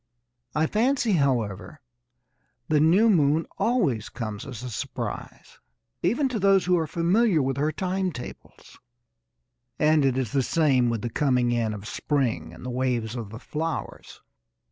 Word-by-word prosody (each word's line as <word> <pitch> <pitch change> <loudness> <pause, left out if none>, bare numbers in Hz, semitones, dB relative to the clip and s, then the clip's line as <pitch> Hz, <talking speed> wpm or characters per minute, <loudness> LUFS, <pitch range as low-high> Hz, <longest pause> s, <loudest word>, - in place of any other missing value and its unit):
I 155 +1 +3
fancy, 235 - +1
however, 135 - 0 0.9
the 155 -1 +3
new 175 +9 +5
moon 160 -5 +3
always 140 - +1
comes 110 -1 -6
as 125 -3 -7
a 125 - -5
surprise - - -6 0.4
even 240 - +1
to 240 -4 -2
those 195 -1 +4
who 180 0 +3
are 160 - -1
familiar 175 +4 +2
with 135 0 -1
her 150 +2 +1
time 185 +2 -1
tables. 125 - -11 1.0
And 155 -1 +3
it 130 -2 +2
is 125 -5 -1
the 135 - +2
same 130 -4 +2
with 115 -1 -2
the 120 - -3
coming 125 -3 +1
in 115 -2 0
of 105 0 -7
spring 135 -5 -1
and - - -12
the 125 - -3
waves 125 -3 -1
of 115 -4 -5
the 110 - -8
flowers. 160 +6 -5
145 Hz, 155 wpm, -25 LUFS, 120-175 Hz, 1.0 s, new